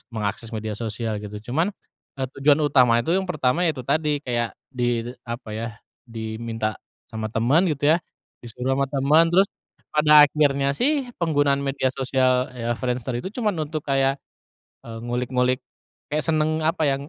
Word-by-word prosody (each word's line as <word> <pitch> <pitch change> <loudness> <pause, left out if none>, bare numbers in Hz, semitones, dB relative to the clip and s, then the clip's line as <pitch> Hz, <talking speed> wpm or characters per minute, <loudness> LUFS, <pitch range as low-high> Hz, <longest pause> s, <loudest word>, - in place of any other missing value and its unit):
mengakses 110 0 -4
media 110 0 -4
sosial 110 0 -3
gitu 105 0 -7 0.2
cuman, 165 +7 +2 0.5
eee, 135 -1 -2
tujuan 145 +1 +5
utama 125 -5 +4
itu 165 - +1
yang 190 +1 0
pertama 155 -2 +1
ya 155 - -1
itu 130 - -6
tadi 150 +1 0
kayak 120 -3 -2 0.2
di 120 -2 0 0.2
apa 120 0 -6
ya, 110 +2 -3 0.4
diminta 110 -1 -4 0.3
sama 110 -1 -3
teman 130 - +2
gitu 150 0 +2
ya, - - +4 0.4
disuruh 125 +2 -3
sama 140 +1 +1
teman 145 +4 +4
terus, 190 +4 +4 0.5
pada 150 -1 +8
akhirnya 140 -2 +1
sih 280 - +1 0.2
penggunaan 145 -4 +2
media 135 -1 -1
sosial 130 -1 +1
ya 120 -1 -3
Friendster 125 0 -3
itu 125 +11 -4
cuman 215 -2 -1
untuk 155 0 -5
kayak, 135 0 +2 0.7
eee, 115 -1 -7
ngulik-ngulik, 125 +1 0 0.5
kayak 150 +1 -1
senang 155 0 +1
apa 160 +1 0
ya 140 - +3
135 Hz, 160 wpm, -23 LUFS, 120-150 Hz, 0.7 s, pada